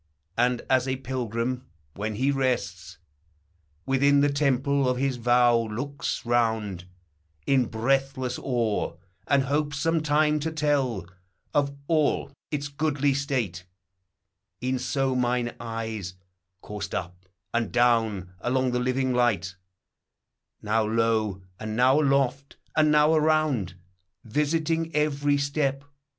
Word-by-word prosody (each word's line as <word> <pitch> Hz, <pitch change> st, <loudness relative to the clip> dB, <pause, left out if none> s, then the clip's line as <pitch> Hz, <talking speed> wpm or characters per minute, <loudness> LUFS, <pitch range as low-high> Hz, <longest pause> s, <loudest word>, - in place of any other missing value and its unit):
And, 125 Hz, +1 st, +1 dB
as 130 Hz, 0 st, +2 dB
a 130 Hz, -, 0 dB
pilgrim, 125 Hz, -1 st, -3 dB, 0.3 s
when 105 Hz, +2 st, -4 dB
he 135 Hz, +5 st, +1 dB
rests 130 Hz, -2 st, -2 dB, 0.9 s
Within 140 Hz, +1 st, +3 dB
the 145 Hz, 0 st, +2 dB
temple 140 Hz, -1 st, +2 dB
of 125 Hz, -, 0 dB
his 135 Hz, -1 st, 0 dB
vow, 120 Hz, 0 st, +4 dB
looks 115 Hz, +7 st, -3 dB
round 110 Hz, -6 st, 0 dB, 0.6 s
In 135 Hz, -2 st, +3 dB
breathless 130 Hz, +2 st, 0 dB
awe, 115 Hz, -9 st, -1 dB, 0.3 s
and 140 Hz, -1 st, +3 dB
hopes 145 Hz, +2 st, -1 dB
some 165 Hz, +3 st, +1 dB
time 150 Hz, 0 st, +2 dB
to 160 Hz, +2 st, -2 dB
tell 140 Hz, -, 0 dB, 0.5 s
Of 140 Hz, -1 st, +1 dB
all 155 Hz, -3 st, +1 dB, 0.2 s
its 145 Hz, -1 st, -2 dB
goodly 145 Hz, -1 st, 0 dB
state; 125 Hz, -10 st, -2 dB, 1.0 s
e'en 130 Hz, 0 st, 0 dB
so 130 Hz, +1 st, 0 dB
mine 125 Hz, -1 st, 0 dB
eyes 110 Hz, -5 st, -5 dB, 0.5 s
Coursed 100 Hz, -1 st, -5 dB
up 90 Hz, +1 st, -6 dB, 0.3 s
and 115 Hz, -3 st, 0 dB
down 115 Hz, -6 st, +2 dB
along 130 Hz, +4 st, 0 dB
the 125 Hz, -, 0 dB
living 130 Hz, +1 st, 0 dB
light, 105 Hz, -7 st, +1 dB, 1.1 s
Now 110 Hz, +1 st, +2 dB
low, 110 Hz, -3 st, 0 dB, 0.2 s
and 110 Hz, 0 st, -4 dB
now 130 Hz, +5 st, +4 dB
aloft, 140 Hz, -1 st, 0 dB, 0.2 s
and 155 Hz, -1 st, +4 dB
now 150 Hz, +1 st, +5 dB
around, 155 Hz, -, +2 dB, 0.5 s
Vfsiting 160 Hz, +5 st, 0 dB
every 145 Hz, -1 st, +2 dB
step. 140 Hz, -1 st, -1 dB
130 Hz, 120 wpm, -26 LUFS, 115-140 Hz, 1.1 s, now